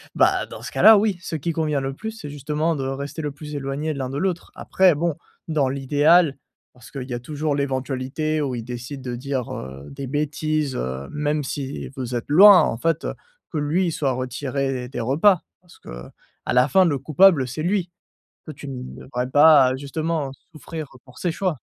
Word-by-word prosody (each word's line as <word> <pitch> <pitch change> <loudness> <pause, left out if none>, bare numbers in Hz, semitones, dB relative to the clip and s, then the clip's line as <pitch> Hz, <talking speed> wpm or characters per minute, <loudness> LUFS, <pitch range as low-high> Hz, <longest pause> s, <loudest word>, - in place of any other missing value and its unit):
bah, - - +3
dans - - -10
ce - - -6
cas-là 220 0 +7
oui, 205 -2 +1
ce 170 - -5
qui 160 +3 -2
convient 155 -3 -1
le 135 0 -3
plus 220 +10 -6
c'est 220 -9 -9
justement 150 +3 -1
de 135 - -3
rester 140 +4 -4
le 150 -2 -3
plus 150 +1 -9
éloigné 140 +3 -3
l'un 135 -3 -4
de 135 - -4
l'autre. 175 +1 -2
Après 185 -4 +3
bon, 165 +1 -1 0.3
dans 150 -4 +2
l'idéal 145 +3 +3 0.4
parce 125 -2 -15
qu'il 135 -3 -5
y - - -3
a 120 - -3
toujours 150 +4 -3
l'éventualité 140 +2 -2
où 135 -4 -2
il 115 - -5
décide 125 +3 -7
de 125 -1 -4
dire, 130 0 -3
heu, 65 +2 -8
des 140 -1 -6
bêtises, 150 0 -1
heu, 65 +2 -4
même 150 0 -1
si 135 0 -5
vous 125 -2 -4
êtes 120 - -3
loin 195 +5 +9
en - - 0
fait, 165 +5 0
heu, - - -2 0.4
que 160 - -3
lui 165 +5 +1
il - - 0
soit 140 -4 0
retiré 130 0 -3
des 130 - -5
repas. 160 - +3 0.2
Parce 175 -1 -19
qu'à - - -10 0.4
la 125 +1 +4
fin, 185 +7 +4
le 150 -5 +1
coupable, 150 +1 +4
c'est 135 +5 -5
lui! 180 0 0 0.6
Toi, 155 - -7
tu 140 - -9
ne 130 -2 -6 0.2
devrais 125 -1 -3
pas, 145 -3 +6
justement, 150 +1 -3 0.2
souffrir 155 +1 -7 0.2
pour 125 - -16
ses 175 - -1
choix! 180 -4 -2
145 Hz, 200 wpm, -23 LUFS, 130-160 Hz, 0.6 s, loin